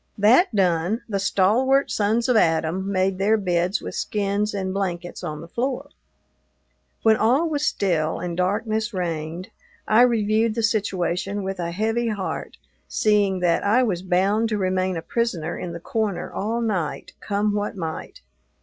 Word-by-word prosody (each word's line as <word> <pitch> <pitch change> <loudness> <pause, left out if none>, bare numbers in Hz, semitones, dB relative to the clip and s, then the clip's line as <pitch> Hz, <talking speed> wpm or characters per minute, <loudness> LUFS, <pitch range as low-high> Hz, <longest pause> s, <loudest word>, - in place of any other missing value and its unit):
That 225 - +4
done, 180 +3 +1
the 200 -3 -1
stalwart 230 +8 +2
sons 220 +3 +1
of 250 - +3
Adam 170 +1 +1
made 190 0 0
their 210 +3 +3
beds 180 -1 0
with - - -5
skins 205 0 -1
and 190 -2 -3
blankets 175 -3 -3
on 150 -1 -5
the 165 - -10
floor. 260 +8 -3 1.1
When 220 -1 +5
all 260 +10 +3
was 300 -1 -1
still 165 -5 0
and 175 -1 -4
darkness 215 +4 -1
reigned, 170 0 -3 0.4
I 220 +2 +5
reviewed 220 -2 +2
the 230 - -1
situation 200 -2 -1
with 190 -1 -4
a 170 -1 -2
heavy 225 +6 -1
heart, 205 -4 -4 0.3
seeing 205 -3 +2
that 170 -2 +2
I 225 +6 +3
was 185 -7 -1
bound 195 +5 +1
to 215 - 0
remain 185 -1 0
a 165 - -5
prisoner 180 -9 -2
in 175 - -5
the 170 - -6
corner 210 0 -2
all 225 +4 -2
night, 190 -9 -2
come 205 0 0
what 205 0 -2
might. 160 -3 -6
200 Hz, 160 wpm, -23 LUFS, 180-220 Hz, 1.1 s, When